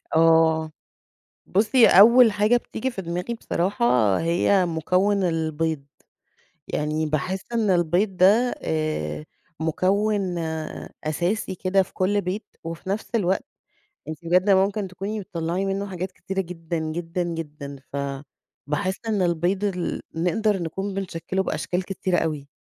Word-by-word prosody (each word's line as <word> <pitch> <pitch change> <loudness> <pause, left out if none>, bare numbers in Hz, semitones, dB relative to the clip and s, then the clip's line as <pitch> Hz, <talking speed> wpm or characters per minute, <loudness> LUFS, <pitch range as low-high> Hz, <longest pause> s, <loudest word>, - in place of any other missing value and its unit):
آه. 160 -1 +4 0.7
بُصي 220 +5 +4
أول 235 +4 +8
حاجة 210 +4 +3
بتيجي 260 +2 -4
في 195 -5 -5
دماغي 180 +6 -3
بصراحة 125 - +1
هي 175 +3 +2
مُكوّن 185 +5 +1
البيض. 160 -3 -1 0.8
يعني 155 +1 -1
باحس 155 +5 -1
إن 220 -3 +1
البيض 180 +2 +2
ده 215 +7 +5
آآ، 155 -1 -2 0.3
مُكوّن 190 +3 0 0.7
أساسي 175 +6 -1
كده 190 +2 +2
في - - -18
كُل 200 +2 +1
بيت، 190 +4 -4 0.2
وفي 165 +3 -6
نفس 205 +3 -2
الوقت 195 +3 +1 0.6
أنتِ 155 -1 -5
بجد 180 +4 +3
ممكن 195 +1 +2
تكوني 200 +4 -4
بتطلّعي 170 0 -3
منه 195 +1 -2
حاجات 185 -1 -5
كتيرة 195 +1 -4
جدًا، 170 -2 -4
جدًا، 165 +2 -3
جدًا 150 -4 -5 0.2
فباحس 145 +5 -4
إن 210 -3 +1
البيض 175 +3 0
ال 180 -4 -2
نقدر 190 +5 +1
نكون 190 +4 -4
بنشكّله 190 -1 -2
بأشكال 180 -1 -2
كتيرة 185 -2 -1
أوي. 150 -3 -2
180 Hz, 125 wpm, -24 LUFS, 160-195 Hz, 0.8 s, أول